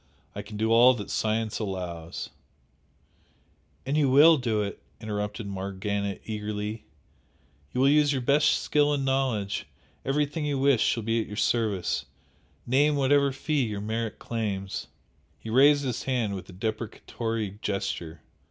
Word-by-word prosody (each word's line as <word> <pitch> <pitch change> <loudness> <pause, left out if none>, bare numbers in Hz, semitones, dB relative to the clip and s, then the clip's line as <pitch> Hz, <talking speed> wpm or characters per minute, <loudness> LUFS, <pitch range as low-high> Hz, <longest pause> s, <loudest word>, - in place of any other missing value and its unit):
I - - -5
can 105 - -9
do 110 +1 +1
all 120 +3 +7
that 105 -3 -6
science 110 0 -1
allows 90 -5 -5 0.7
" 80 +1 -38
"And 135 +2 -1
you 145 -3 +3
will 155 +5 +7
do 115 -5 0
it!" 100 - -6 0.2
interrupted 105 0 -4
Morgana 100 +1 -3
eagerly, 105 0 -4 0.9
"You 125 - -1
will 135 - +5
use 150 0 +4
your 130 -3 -1
best 145 +4 +3
skill 145 0 +2
and 135 -1 -2
knowledge 130 -7 -1 0.4
everything 150 +3 -1
you 145 -2 -1
wish 135 -3 +3
shall 115 - +1
be 115 +1 +1
at - - -6
your 105 - -8
service 105 -4 0 0.6
name 145 +4 +3
whatever 140 0 +3
fee 145 +2 -1
your 105 -3 -4
merit 110 +1 -3
claims 100 -4 -4 0.3
" - - -38
He 110 - -7
raised 140 +4 +5
his 125 -4 -2
hand 120 -6 -1
with 95 0 -7
a - - -10
deprecatory 110 0 -4
gesture. 85 -5 -3
115 Hz, 150 wpm, -27 LUFS, 105-135 Hz, 0.9 s, all